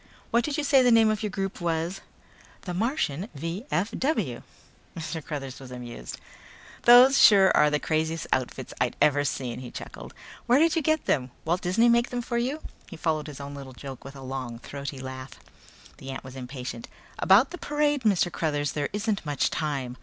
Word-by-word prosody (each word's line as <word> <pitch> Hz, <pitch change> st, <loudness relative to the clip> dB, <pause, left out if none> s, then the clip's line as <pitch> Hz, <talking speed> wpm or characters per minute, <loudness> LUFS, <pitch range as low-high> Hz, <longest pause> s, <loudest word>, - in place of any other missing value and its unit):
What 235 Hz, +1 st, +3 dB
did 295 Hz, +2 st, -2 dB
you 300 Hz, -, 0 dB
say 275 Hz, -2 st, +5 dB
the 250 Hz, -, +4 dB
name 225 Hz, -1 st, +6 dB
of 215 Hz, 0 st, -2 dB
your 215 Hz, -, -1 dB
group 195 Hz, -1 st, -4 dB
was?" 170 Hz, +2 st, -1 dB, 0.6 s
"The 180 Hz, -, -5 dB
Martian 205 Hz, -, -1 dB
V.F.W." 190 Hz, -, -2 dB, 0.6 s
Mr. 160 Hz, -1 st, -5 dB
Cruthers 135 Hz, -4 st, -6 dB
was 135 Hz, -2 st, -10 dB
amused. 120 Hz, -, -8 dB, 0.7 s
"Those 250 Hz, +3 st, +8 dB
sure 195 Hz, -3 st, +7 dB
are 150 Hz, -, +5 dB
the 150 Hz, 0 st, 0 dB
craziest 160 Hz, 0 st, -1 dB
outfits 130 Hz, 0 st, -3 dB
I've 125 Hz, -1 st, +1 dB
ever 145 Hz, -1 st, +4 dB
seen," 125 Hz, -4 st, -3 dB
he 125 Hz, -1 st, -8 dB
chuckled. -, -, -9 dB, 0.3 s
"Where'd 305 Hz, +7 st, +4 dB
you 325 Hz, -, +2 dB
get 315 Hz, +1 st, +1 dB
them? 130 Hz, -2 st, +1 dB, 0.2 s
Walt 175 Hz, +3 st, 0 dB
Disney 200 Hz, +7 st, +3 dB
make 235 Hz, 0 st, +3 dB
them 245 Hz, -1 st, -3 dB
for 235 Hz, 0 st, -1 dB
you?" 270 Hz, +6 st, -2 dB, 0.3 s
He 170 Hz, -, -9 dB
followed 155 Hz, -2 st, -1 dB
his 145 Hz, -2 st, -9 dB
own 140 Hz, 0 st, -7 dB
little 135 Hz, -2 st, -9 dB
joke 135 Hz, 0 st, -9 dB
with 135 Hz, +1 st, -10 dB
a 135 Hz, -, -10 dB
long 130 Hz, -3 st, -5 dB
throaty 140 Hz, +3 st, -7 dB
laugh. 130 Hz, 0 st, -7 dB, 0.7 s
The 135 Hz, -, -9 dB
ant 135 Hz, 0 st, -6 dB
was 130 Hz, 0 st, -10 dB
impatient. 125 Hz, -2 st, -7 dB, 0.3 s
"About 210 Hz, +10 st, +5 dB
the 360 Hz, -, -7 dB
parade, 295 Hz, -1 st, 0 dB
Mr. 195 Hz, -6 st, +2 dB
Cruthers, 145 Hz, -4 st, -1 dB
there 145 Hz, -2 st, -2 dB
isn't 210 Hz, 0 st, -1 dB
much 145 Hz, -3 st, 0 dB
time." 135 Hz, -4 st, -3 dB
160 Hz, 185 wpm, -26 LUFS, 135-230 Hz, 0.7 s, Those